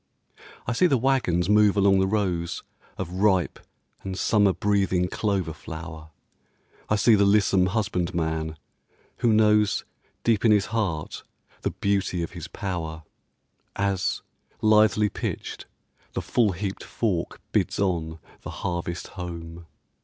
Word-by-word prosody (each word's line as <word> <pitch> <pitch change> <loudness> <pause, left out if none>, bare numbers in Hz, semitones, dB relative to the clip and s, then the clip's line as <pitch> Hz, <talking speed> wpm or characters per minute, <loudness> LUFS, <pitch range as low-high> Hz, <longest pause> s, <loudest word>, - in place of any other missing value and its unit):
I - - -1
see 155 +10 +4
the 140 - +3
wagons 115 -10 +1
move 105 0 +4
along 100 -1 +5
the 95 - +2
rows 90 -5 -1 0.3
Of 90 -2 -4
ripe 95 -2 +2 0.4
and 95 -1 -5
summer 105 -1 +3
breathing 95 -2 +1
clover 95 -5 -1
flower, 80 0 -9 0.8
I 105 - +3
see 110 +2 +5
the 100 -1 +5
lissom 100 -2 +4
husbandman 85 -6 -1 0.6
who 120 - +2
knows 105 -1 +3 0.4
Deep 115 -3 +2
in 115 - +5
his 105 -2 +4
heart 90 -9 -2 0.4
the - - 0
beauty 100 -3 -1
of 85 - -5
his 85 -2 -7
power, 80 -5 -5 0.7
As, 100 -2 0 0.4
lithely 105 -1 +4
pitched, - - -5 0.5
the - - -2
full 110 -5 +2
heaped 95 +2 -4
fork 95 -8 -2
bids - - 0
on 85 -5 -1 0.2
The - - -7 0.2
harvest 85 0 -3
home. 85 -2 -8
95 Hz, 130 wpm, -25 LUFS, 85-105 Hz, 0.8 s, along